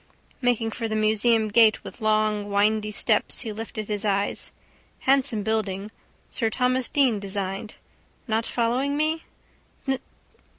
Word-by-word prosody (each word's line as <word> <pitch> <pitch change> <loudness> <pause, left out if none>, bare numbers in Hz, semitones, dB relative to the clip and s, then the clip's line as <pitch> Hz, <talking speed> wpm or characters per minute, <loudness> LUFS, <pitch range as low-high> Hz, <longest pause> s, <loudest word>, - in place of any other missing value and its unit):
Making 240 -3 +1
for 230 +1 -3
the 220 - -2
museum 220 +1 +3
gate 220 0 +5
with - - -10
long 215 -1 +1
windy 210 +1 +2
steps 210 +1 +1
he 225 -4 -5
lifted 215 -1 -6
his 210 -1 -2
eyes. 200 -1 -1 0.5
Handsome 265 -5 +2
building. 210 -2 -2 0.4
Sir 225 -4 0
Thomas 250 +2 +1
Deane 260 -7 +2
designed. 195 +1 -4 0.5
Not 225 0 0
following 250 +5 0
me? 315 +2 0
220 Hz, 125 wpm, -25 LUFS, 210-240 Hz, 0.5 s, gate